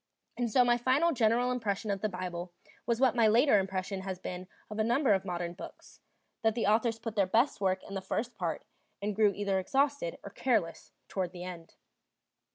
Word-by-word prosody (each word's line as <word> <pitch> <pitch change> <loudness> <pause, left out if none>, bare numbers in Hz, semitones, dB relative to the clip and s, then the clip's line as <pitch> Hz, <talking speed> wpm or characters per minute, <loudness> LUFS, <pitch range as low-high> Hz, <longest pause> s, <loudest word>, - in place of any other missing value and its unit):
And 240 -1 -1
so 250 +3 +5
my 240 0 +4
first 275 +8 +3
general 240 0 +2
impression 215 -4 -2
of 195 -1 -2
the 215 - 0
Bible 180 -1 -5 0.4
was 235 -1 +1
what 260 -3 +4
my 230 -2 +5
later 230 +1 +5
impression 190 0 -3
has 190 -1 -4
been 180 0 -6 0.2
of 215 0 -6
a - - +3
number 240 +1 +3
of 190 0 0
modern 175 -2 -3
books, 180 - -12 0.4
that 225 -1 +2
the 235 - 0
authors 225 +2 +2
put 225 -1 -6
their 200 -3 +3
best 230 +4 +2
work 190 -1 +1
in 195 - -10
the 195 - -3
first 225 +5 -3
part, 175 -6 -3 0.4
and 205 0 -2
grew 210 -1 +4
either 200 -2 0
exhausted 270 -2 0
or 200 - -8
careless 210 -11 -1 0.2
toward 185 -2 -3
the 175 -1 -7
end. 175 -2 -9
210 Hz, 200 wpm, -31 LUFS, 185-235 Hz, 0.4 s, so